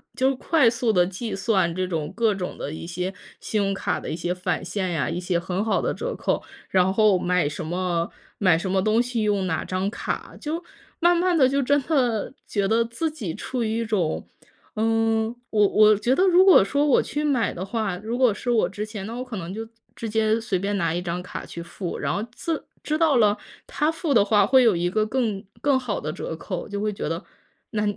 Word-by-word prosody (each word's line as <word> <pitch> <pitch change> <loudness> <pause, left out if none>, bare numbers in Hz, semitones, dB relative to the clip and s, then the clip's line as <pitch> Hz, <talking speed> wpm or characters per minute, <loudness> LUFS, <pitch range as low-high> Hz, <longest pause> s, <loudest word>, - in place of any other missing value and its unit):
就 265 +1 +2
快 280 -1 +3
速 230 -1 0
地 180 -1 +4
计 200 +4 -5
算 190 -4 +1
这 185 +1 -1
种 160 -4 -3
各 225 -3 +2
种 180 -2 -4
的 145 - -5
一 160 - -7
些 180 +2 -3 0.3
信 215 - -2
用 195 0 0
卡 195 - -1
的 - - -8
一 - - -2
些 175 +1 -3
返 180 +1 -2
现 185 0 -2
呀， 140 -7 0
一 - - -2
些 180 -1 0
很 180 +3 -2
好 220 - +1
的 - - 0
折 - - -4
扣， - - -1 0.3
然 190 0 +3
后 210 -2 +4
买 180 -3 +1
什 155 +2 -5
么 175 0 -1 0.3
买 185 -5 +4
什 185 +3 -3
么 190 +1 +2
东 215 +3 +3
西 245 -2 -2
用 205 -3 +1
哪 160 -3 -1
张 185 +1 -1
卡。 - - -5
就 320 +4 -4 0.4
慢 345 +1 +4
慢 360 0 +2
地 275 -5 +5
就 280 +1 +1
真 285 +2 +3
的 250 -9 +1
觉 200 -2 0
得 225 +3 +3
自 235 +8 -2
己 220 - -5
处 250 +6 -3
于 220 +1 -1
一 - - 0
种 190 -8 -1 0.5
嗯， 225 +1 +1
我 210 -2 +4
我 215 +1 +6
觉 245 +5 +1
得 370 - +3
如 365 +1 +6
果 380 - +8
说 285 +9 +1
我 285 - +4
去 295 +1 -3
买 265 -8 +1
的 185 +2 -5
话， 215 -3 -2
如 220 +5 -4
果 250 -4 +5
是 240 +4 -3
我 230 - +2
之 205 +2 -4
前， 210 -2 -7
那 230 - -6
我 250 - -4
可 250 -3 -7
能 170 -1 -5
就 225 +3 -5 0.3
直 230 - -5
接 220 0 +2
随 200 -5 -1
便 200 +1 -1
拿 165 -3 0
一 175 - -1
张 180 0 -3
卡 - - -7
去 170 - -8
付， 175 +1 -5
然 140 -1 -1
后 205 - -1
自 325 +5 -3 0.2
知 305 - -1
道 315 -4 +4
了 210 -3 +4 0.3
他 300 +2 0
付 325 -2 -1
的 220 -5 +6
话 205 -1 +4
会 260 +5 +5
有 230 -6 +4
一 175 +1 0
个 215 +2 +2
更 220 -5 -1 0.2
更 280 -2 +3
好 240 -5 -3
的 155 - -4
折 160 - -5
扣， 180 +3 -5
就 200 0 -3
会 210 0 -1
觉 160 - -4
得 165 +1 -3 0.5
那 210 -2 -1
210 Hz, 250 characters per minute, -24 LUFS, 185-240 Hz, 0.5 s, 果